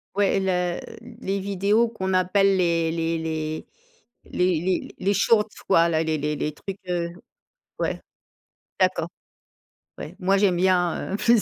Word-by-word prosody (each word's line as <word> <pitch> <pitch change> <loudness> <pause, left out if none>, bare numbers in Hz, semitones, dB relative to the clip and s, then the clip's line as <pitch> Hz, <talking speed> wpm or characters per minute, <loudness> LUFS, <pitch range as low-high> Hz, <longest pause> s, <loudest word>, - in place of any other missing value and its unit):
Ouais 200 -1 +2
et - - +2
la 180 -2 0 0.4
les 195 +1 -1
vidéos 200 +4 +2
qu'on 190 -5 -3
appelle 190 +2 +3
les 170 -2 +1
les 165 0 -1
les 155 -1 -3 0.6
les 180 -3 +1
les 185 +1 -1
les 195 +2 +1
shorts 210 +1 +3 0.2
quoi, 170 -3 +5
là. 160 0 +1
Les 160 -1 0
les 150 +1 -2
les 150 +1 -2
trucs, 195 +4 -7
heu 170 -1 -1 0.7
Ouais. - - -1 0.8
D'accord. - - +2 0.9
Ouais. - - -8
Moi 195 +2 +2
j'aime 195 -3 +3
bien, 180 -1 +1
heu, 200 - 0
plus 235 -1 +4
185 Hz, 150 wpm, -24 LUFS, 165-195 Hz, 0.9 s, quoi